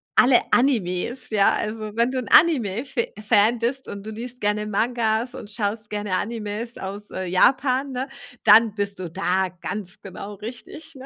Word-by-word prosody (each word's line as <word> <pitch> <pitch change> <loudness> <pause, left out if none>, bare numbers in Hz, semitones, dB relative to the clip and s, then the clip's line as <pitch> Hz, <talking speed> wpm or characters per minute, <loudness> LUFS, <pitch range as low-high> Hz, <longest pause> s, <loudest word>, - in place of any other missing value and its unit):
alle 255 -1 +6
Animes, 245 0 +1
ja, 205 -2 +3
also 215 0 -4
wenn 235 +2 +2
du 260 - -3
'n 250 - -3
Anime 245 - +4
Fa 260 -3 -2 0.2
Fan 215 +3 +4
bist, 255 +3 -2
und 200 +1 -8
du - - -6
liest 240 +3 -7
gerne 210 +1 0
Mangas 225 +2 0
und 235 -5 -9
schaust 210 0 -2
gerne 205 -2 -2
Animes 225 +2 -4
aus, 200 +2 -5
äh, 185 - -4
Japan, 260 +9 +2
ne, 260 +2 -3 0.3
dann 220 0 +6
bist 200 -2 -3
du 180 -2 -5
da 190 +1 0
ganz 190 -1 -6
genau 200 +2 -8
richtig, 250 +9 -9
ne? 265 0 -10
220 Hz, 175 wpm, -23 LUFS, 205-250 Hz, 0.3 s, alle